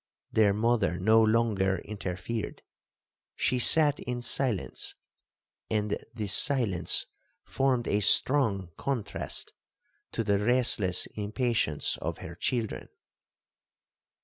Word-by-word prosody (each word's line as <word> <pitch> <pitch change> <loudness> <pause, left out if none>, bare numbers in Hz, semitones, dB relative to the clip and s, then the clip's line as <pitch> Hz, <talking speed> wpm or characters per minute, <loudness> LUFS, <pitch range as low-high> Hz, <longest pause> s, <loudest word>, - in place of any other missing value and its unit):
Their 110 -2 +4
mother 110 -3 +1
no 110 +5 +4
longer 110 -4 +1
interfered,—she 105 +5 -6
sat 150 +2 +5
in 120 -1 -5
silence, 125 -6 -1 0.7
and 105 -1 -1 0.2
this 105 -5 -2
silence 120 - +2 0.4
formed 130 -2 0
a 105 - +1
strong 105 - +2
contrast 130 -7 -3 0.6
to 115 - -1
the 100 -2 +1
restless 110 -5 +2
impatience 105 - -1
of - - -4
her 85 - -9
children. 115 +5 -3
110 Hz, 95 wpm, -28 LUFS, 100-120 Hz, 0.7 s, sat